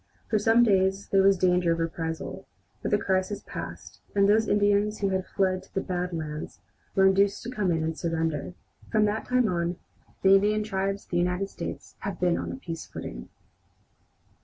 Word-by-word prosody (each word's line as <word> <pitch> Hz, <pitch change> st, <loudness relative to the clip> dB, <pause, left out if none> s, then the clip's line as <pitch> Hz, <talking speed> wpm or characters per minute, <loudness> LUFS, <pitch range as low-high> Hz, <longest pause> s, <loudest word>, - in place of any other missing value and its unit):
For 215 Hz, -, +3 dB
some 225 Hz, +3 st, +5 dB
days 195 Hz, -2 st, +2 dB
there 195 Hz, -, +4 dB
was 195 Hz, 0 st, +5 dB
danger 180 Hz, -1 st, +3 dB
of 165 Hz, -, -4 dB
a -, -, +2 dB
reprisal, 165 Hz, 0 st, -4 dB, 0.3 s
but -, -, -2 dB
the 205 Hz, -, +3 dB
crisis 190 Hz, 0 st, -1 dB
passed, -, -, -8 dB, 0.2 s
and 200 Hz, 0 st, +4 dB
those 220 Hz, +1 st, +4 dB
Indians 205 Hz, +1 st, +2 dB
who 200 Hz, -, 0 dB
had 190 Hz, -1 st, -1 dB
fled 185 Hz, -1 st, 0 dB
to -, -, -21 dB
the -, -, +2 dB
"Bad 180 Hz, -1 st, -2 dB
Lands" 155 Hz, -2 st, -5 dB, 0.4 s
were 190 Hz, -, +5 dB
induced 195 Hz, +1 st, +3 dB
to 245 Hz, -, -5 dB
come 210 Hz, -7 st, 0 dB
in 165 Hz, -1 st, 0 dB
and 160 Hz, 0 st, -2 dB
surrender. 165 Hz, -1 st, -2 dB, 0.4 s
From 215 Hz, -2 st, +4 dB
that 210 Hz, +1 st, -1 dB
time 250 Hz, -2 st, +3 dB
on 175 Hz, -2 st, -1 dB, 0.5 s
the 190 Hz, 0 st, +7 dB
Indian 210 Hz, +2 st, +3 dB
tribes 195 Hz, -1 st, -2 dB
of -, -, -33 dB
the 175 Hz, -, +1 dB
United 180 Hz, +3 st, 0 dB
States -, -, -7 dB
have 200 Hz, -3 st, -5 dB
been 180 Hz, -1 st, +2 dB
on -, -, -4 dB
a -, -, -5 dB
peace 165 Hz, -11 st, -7 dB
footing. -, -, -8 dB
190 Hz, 195 wpm, -27 LUFS, 175-205 Hz, 0.5 s, the